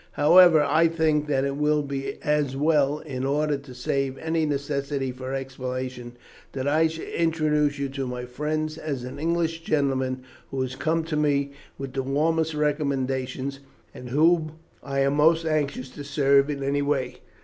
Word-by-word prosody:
However, 165 +1 +7
I 160 +3 +4
think 160 -2 +1
that 135 -2 +1
it 140 0 -2
will 150 0 +2
be 140 -1 -4
as 150 -3 0
well, 150 -1 +2
in 135 -4 -6
order 145 +2 +1
to 140 -2 -10
save 135 +1 -1
any 160 0 0
necessity 140 -1 -2
for 130 +1 -5
explanation, 130 -2 -5 0.4
that 135 0 -3
I 155 +3 +4
should 160 0 -7
introduce 155 -3 +1
you 140 0 -2
to 135 -1 -4
my 125 0 -5
friends 155 +5 -3
as 140 -6 -4
an 125 +3 -7
English 165 0 0
gentleman 135 -4 0 0.3
who 135 - -4
has 130 0 -5
come 160 +4 0
to 160 -1 -3
me 140 -2 +1 0.3
with 135 -1 -6
the 135 - -1
warmest 155 +4 0
recommendations, 135 -2 -1 0.3
and 125 - -9
whom 155 +3 +3 0.3
I 135 -1 -2
am 140 +1 +2
most 160 +3 +4
anxious 145 -4 -1
to 145 - -9
serve 140 0 +3
in 140 -2 -3
any 140 +1 0
way. 135 -3 -1
140 Hz, 170 wpm, -25 LUFS, 135-155 Hz, 0.4 s, However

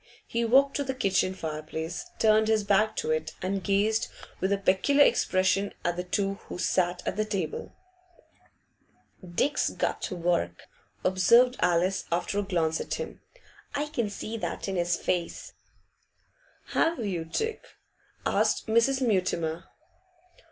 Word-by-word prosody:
He 235 0 -1
walked 270 +4 +4
to 285 - 0
the 265 -1 -3
kitchen 190 -5 +1
fireplace, 160 - -5
turned 220 0 +4
his 220 -1 +2
back 210 +2 +2
to 155 - -1
it, 155 0 -1
and 190 +1 -2
gazed 210 +2 +2 0.3
with 190 +2 0
a 200 - +3
peculiar 200 +10 +4
expression 190 +2 +2
at 175 0 +1
the 180 - -3
two 195 +2 -1
who - - -6
sat 180 0 0
at - - -2
table. 185 -7 -3 1.5
'Dick's 220 +12 0
got - - -2
work,' 170 - -1 0.4
observed 235 +7 +5
Alice, 180 +2 +2
after 175 +4 0
a - - +2
glance 170 -5 0
at - - -3
him. - - -6 0.5
'I 295 +1 -1
can 235 -8 -1
see 215 +2 -5
that 215 - -4
in 195 - -2
his 175 -1 +1
face.'. 175 -2 -3 1.2
'Have 325 -9 +1
you, 180 -5 -2
Dick?' 445 - -3 0.6
asked - - +1
Mrs. 230 +4 +2
Mutimer. 175 -4 0
195 Hz, 135 wpm, -28 LUFS, 175-225 Hz, 1.5 s, observed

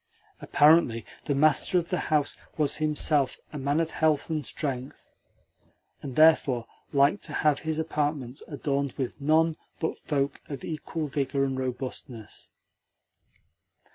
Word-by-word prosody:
Apparently 145 -7 +4 0.2
the 145 - 0
master 155 +5 +3
of 170 -1 -1
the 180 - 0
house 150 -2 +1 0.2
was 150 -3 +1
himself 150 -3 +1 0.2
a 150 - -4
man 140 +3 +1
of 165 -1 0
health 155 -1 +1
and 155 -2 -1
strength, 135 -2 -4 0.9
and 135 -3 -7
therefore 150 -7 +4 0.3
liked 140 +7 +3
to - - -7
have 150 -2 +4
his 160 0 -2
apartments 150 -4 -2
adorned 140 -2 -2
with 130 +1 -4
none 160 +2 +3 0.2
but 160 - -2
folk 140 -2 -2
of 140 -4 -6
equal 160 0 -4
vigour 140 -1 -1
and 135 -1 -1
robustness. 125 -3 -6
145 Hz, 135 wpm, -27 LUFS, 135-155 Hz, 0.9 s, Apparently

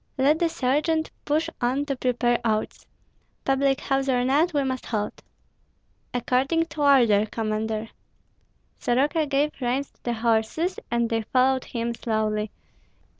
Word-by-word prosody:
"Let 285 +4 +3
the 340 -1 +2
sergeant 315 +2 0
push 310 +3 +1
on 260 +4 +1
to 275 -2 -2
prepare 245 -1 +1
oats. 215 -2 -2 0.6
Public 270 0 +2
house 270 0 0
or 250 -1 +2
not, 300 +7 +3
we 290 -3 +1
must 260 -1 -3
halt." 210 -2 -3 0.9
"According 260 +7 +1
to 295 0 -6
order, 235 -7 +5
Commander." 220 0 -2 0.9
Soroka 295 +6 +1
gave 285 +2 +1
reins 255 +3 -1
to - - -37
the 240 - -2
horses, 230 +10 0
and 235 0 +1
they 225 -1 0
followed 260 +3 +2
him 235 -1 -3
slowly. 215 -2 -1
255 Hz, 135 wpm, -25 LUFS, 230-285 Hz, 0.9 s, order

